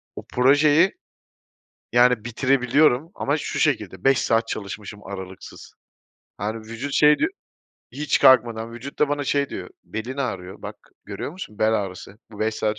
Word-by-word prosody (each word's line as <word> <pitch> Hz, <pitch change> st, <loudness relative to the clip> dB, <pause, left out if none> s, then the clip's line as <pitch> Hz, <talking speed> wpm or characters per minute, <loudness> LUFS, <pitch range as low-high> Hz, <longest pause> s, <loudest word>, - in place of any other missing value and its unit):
o -, -, -7 dB
projeyi, 145 Hz, +7 st, +5 dB, 1.0 s
yani, 120 Hz, -2 st, +4 dB
bitirebiliyorum 130 Hz, +4 st, +2 dB
ama 145 Hz, +2 st, 0 dB
şu 155 Hz, -, -4 dB
şekilde, 105 Hz, -, 0 dB
5 135 Hz, -1 st, +4 dB
saat 115 Hz, 0 st, +1 dB
çalışmışım 105 Hz, 0 st, -6 dB
aralıksız. 95 Hz, -1 st, -9 dB, 0.7 s
Yani, 110 Hz, +2 st, -2 dB
vücut 115 Hz, +6 st, -6 dB
şey 150 Hz, 0 st, +5 dB
diyor 325 Hz, -, +1 dB, 0.6 s
hiç 145 Hz, 0 st, 0 dB
kalkmadan, 115 Hz, -2 st, +4 dB
vücut 130 Hz, +4 st, -9 dB
da 150 Hz, -, +3 dB
bana 145 Hz, 0 st, -1 dB
şey 140 Hz, 0 st, 0 dB
diyor, -, -, -7 dB
"Belin 120 Hz, +6 st, -6 dB
ağrıyor, 95 Hz, -9 st, -4 dB
bak, -, -, -7 dB, 0.3 s
görüyor -, -, -5 dB
musun: 160 Hz, -, -10 dB
bel 110 Hz, +1 st, +3 dB
ağrısı." 100 Hz, 0 st, -4 dB
Bu 105 Hz, -, -12 dB
5 110 Hz, 0 st, 0 dB
saat 110 Hz, 0 st, -1 dB
120 Hz, 150 wpm, -23 LUFS, 110-140 Hz, 1.0 s, projeyi